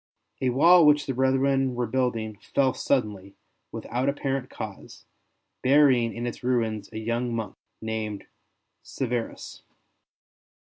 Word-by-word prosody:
A 130 - +2
wall 165 +6 +6
which 150 0 +4
the 135 - -2
brethren 135 0 +1
were 120 0 -1
building 115 -3 -2 0.2
fell 130 -2 +3
suddenly, 105 -7 -2 0.4
without 125 +3 -2
apparent 135 -2 -2
cause, - - -9 0.6
burying 130 -4 +4
in 120 +1 -4
its 120 - -6
ruins 115 -5 -1
a 110 - -7
young 115 +2 -2
monk 110 -4 -4 0.3
named 110 -2 -4 0.6
Severus. 120 -3 -5
125 Hz, 115 wpm, -26 LUFS, 110-135 Hz, 0.6 s, wall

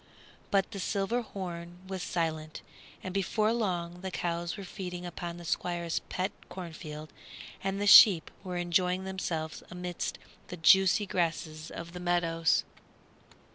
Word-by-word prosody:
But 195 0 +2
the 200 - -5
silver 200 +5 0
horn 175 -5 -6
was 190 -1 -4
silent, 160 -3 -2 0.4
and 185 - -5
before 215 +3 +1
long 180 -6 -2
the 190 - -3
cows 170 0 -2
were 200 - -6
feeding 180 -2 -6
upon 175 0 -5
the 175 - -9
Squire's 170 -1 -1
pet 185 +2 -1 0.2
cornfield 160 -4 -8 0.5
and 195 0 -1
the 205 - 0
sheep 200 -4 +9
were 180 -2 -4
enjoying 180 +1 +1
themselves 170 -4 -3
amidst 180 0 -4 0.3
the 180 - -7
juicy 190 +5 +6
grasses 160 -4 -2
of 170 0 -8
the 180 - -6
meadows. 165 -2 +2
180 Hz, 135 wpm, -30 LUFS, 170-190 Hz, 0.5 s, sheep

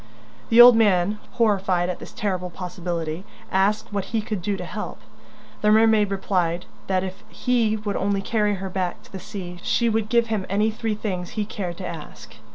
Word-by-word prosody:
The 230 - +5
old 240 0 +11
man, 205 -2 +3
horrified 195 -6 +2
at 180 - -3
this - - -10
terrible 185 -4 -2
possibility, 175 -2 -4 0.3
asked 200 +3 +1
what 200 -2 -1
he 225 - -1
could 215 -3 -3
do 200 +2 -1
to - - -6
help. - - -6 0.6
The 210 - +3
mermaid 220 -1 +5
replied 180 -3 0 0.2
that 185 -1 +1
if 190 +2 -7
he 230 -2 +1
would 210 -1 -3
only 200 0 0
carry 210 -1 +1
her 190 0 -5
back 185 -1 -2
to - - -19
the 190 - -6
sea, 180 -2 -7
she 235 +4 +1
would 220 -1 0
give 235 0 +3
him 215 -4 -2
any 210 +3 +2
three 220 0 -2
things 185 -4 -4
he 210 - +1
cared 180 -4 -5
to 190 - -5
ask. 130 -9 -9
200 Hz, 190 wpm, -24 LUFS, 180-215 Hz, 0.6 s, old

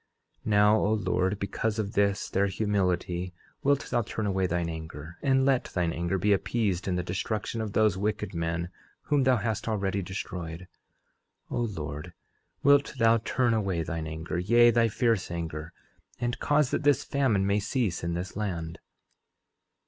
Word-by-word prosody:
11:11 - - -6
Now, 105 +1 +5
O 105 - +2
Lord, 95 -1 0
because 105 +2 -2
of 105 -1 -2
this 100 0 +1
their 100 +1 +1
humility 90 -3 -1 0.3
wilt 140 0 +1
thou 120 - +2
turn 110 0 -4
away 95 -2 +1
thine 85 -1 -1
anger, 80 0 -7
and 135 -1 +3
let 135 -2 +2
thine 85 -2 -1
anger 85 +3 -1
be 100 +3 +3
appeased 100 -2 0
in 90 - 0
the 90 - -1
destruction 105 +5 -3
of 105 -2 -4
those 105 -4 +3
wicked 105 -1 -2
men 85 0 -2 0.3
whom 145 -3 +2
thou 130 -1 +5
hast 110 0 -2
already 100 -3 0
destroyed. 90 -2 -6 0.8
11:12 - - -2
O 105 -10 -2
Lord, 75 +4 -7 0.5
wilt 140 +1 +4
thou 115 -1 +4
turn 120 +1 +1
away 95 -6 0
thine 80 -1 -4
anger, 80 +2 -4
yea, 120 +6 +5
thy 115 -1 +3
fierce 115 -2 +1
anger, 80 -2 -5 0.5
and 120 0 -2
cause 145 -2 +2
that - - 0
this 145 -1 +3
famine 125 -9 +1
may 100 +1 +2
cease 105 -3 -1
in 85 0 -1
this 90 +1 -5
land. 85 -6 -3
100 Hz, 170 wpm, -28 LUFS, 85-115 Hz, 0.8 s, Now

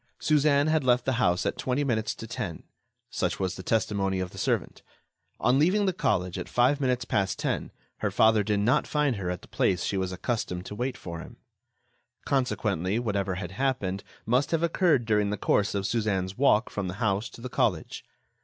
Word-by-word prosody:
Suzanne 145 -1 +3
had 155 -1 +2
left 125 -1 +3
the 130 - +1
house 90 -4 +2
at - - -2
twenty 130 +3 0
minutes 110 -6 -1
to - - -8
ten; - - -5 0.5
such - - -1
was 95 -2 -1
the - - -7
testimony 100 -2 0
of 90 -1 -3
the - - -9
servant. - - -1 0.6
On 130 +2 +3
leaving 190 +7 +3
the 190 - +1
college, 90 - 0
at - - -6
five 130 +4 +3
minutes 125 -2 0
past 95 -1 0
ten, - - -2 0.3
her - - -1
father 110 -1 +4
did 105 0 0
not 120 +5 +2
find 145 -6 +1
her 90 -2 -3
at 90 -1 -4
the - - -13
place 90 -2 +1
she 100 - -1
was 95 -1 -1
accustomed 90 -2 -3
to - - -7
wait 125 +4 -3
for 85 -2 -7
him. - - -11 0.9
Consequently, 105 - 0
whatever 100 -5 -1
had 90 -1 -5
happened 100 -5 -1 0.2
must 125 +5 +2
have 165 0 0
occurred 165 - +2
during 105 -2 +2
the 105 - -2
course 100 +1 +1
of 100 -1 -1
Suzanne's 100 -5 -1
walk 125 -3 +3
from 100 -2 -3
the 90 - -4
house 105 +1 0
to - - -13
the 125 - -5
college. - - -1
110 Hz, 200 wpm, -27 LUFS, 95-130 Hz, 0.9 s, father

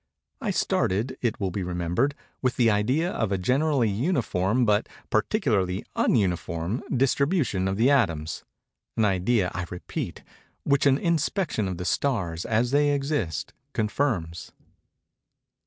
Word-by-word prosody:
I - - -2
started, 110 +8 0
it 120 -3 -1
will 95 -3 -1
be 100 - -3
remembered, 90 +10 0 0.3
with 130 -1 +1
the 115 -3 +4
idea 130 - +1
of 110 -4 -1
a 100 - +1
generally 130 +5 +2
uniform 115 - +1
but 105 0 +2 0.2
particularly 105 - +1
_un_uniform 90 - 0 0.2
distribution 135 - +1
of 95 0 -1
the 120 +6 +4
atoms;—an 95 - -2
idea, 95 0 +1
I 90 -2 -4
repeat, 90 - -5 0.4
which 140 0 +3
an 135 -1 +4
inspection 165 - 0
of 90 -2 -4
the 90 - -5
stars, 90 -11 -1
as 115 +2 +1
they 145 +1 +3
exist, 135 - -2 0.2
confirms. 105 - -1
110 Hz, 125 wpm, -26 LUFS, 90-135 Hz, 0.4 s, the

